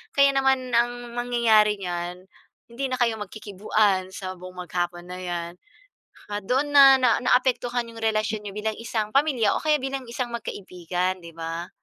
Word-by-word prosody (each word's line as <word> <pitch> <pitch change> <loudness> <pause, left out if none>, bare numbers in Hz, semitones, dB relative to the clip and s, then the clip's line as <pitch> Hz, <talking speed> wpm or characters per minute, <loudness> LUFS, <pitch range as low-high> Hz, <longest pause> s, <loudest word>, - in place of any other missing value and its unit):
Kaya 280 0 +6
naman 265 -2 +2
ang 240 0 0
mangyayari 230 -4 +3
niyan 180 0 -5 0.4
hindi 265 +3 -3
na 255 - -2
kayo 230 -2 +2
magkikibuan 205 -2 0
sa 185 -1 -5
buong 180 0 -9
maghapon 175 0 -3
na 180 0 -7
'yan. 170 -1 -4 0.9
Doon 285 +5 0
na 275 -1 +9
na 250 -3 +3
naapektuhan 245 -1 +1
yung 225 0 -11
relasyon 215 -1 0
n'yo 200 - -5
bilang 220 +1 -1
isang 220 -2 -3
pamilya 270 -8 +3
o - - -5
kaya 305 -1 +3
bilang 270 0 -3
isang 240 0 -3
magkaibigan, 185 -4 -3
'di 170 - -10
ba? 165 +2 -5
220 Hz, 155 wpm, -25 LUFS, 185-250 Hz, 0.9 s, na